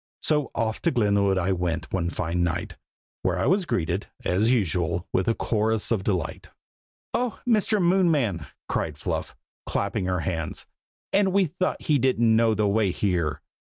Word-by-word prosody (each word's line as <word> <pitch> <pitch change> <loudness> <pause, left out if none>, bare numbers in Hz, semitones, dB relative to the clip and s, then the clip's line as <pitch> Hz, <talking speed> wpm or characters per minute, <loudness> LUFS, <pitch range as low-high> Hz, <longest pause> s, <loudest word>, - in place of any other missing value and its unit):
So 150 -2 +3
off 110 0 -1
to 170 - +2
Glenwood 100 - +2
I 95 +1 +1
went 85 -2 -2
one 90 -3 0
fine 85 0 -2
night, 85 +1 -2 0.5
where - - 0
I - - 0
was 190 -1 +2
greeted, 90 - -1 0.2
as 100 +6 +2
usual, 90 -7 0
with 95 - +1
a 115 - +2
chorus 110 0 0
of 105 -5 +1
delight. 95 -5 -2 0.6
"Oh! 245 -1 -1
Mr. 215 -2 +3
Moonman!" 160 - +2 0.2
cried - - -2
Fluff, - - -3 0.3
clapping 100 -1 -1
her 90 -2 0
hands. 80 -2 -3 0.5
"And 195 -1 +3
we 195 0 +3
thought 185 +3 -2
he 150 -3 +2
didn't 120 -3 +3
know 115 -1 +3
the 105 0 +1
way 100 0 +2
here! 90 -6 -1
105 Hz, 160 wpm, -25 LUFS, 90-140 Hz, 0.6 s, So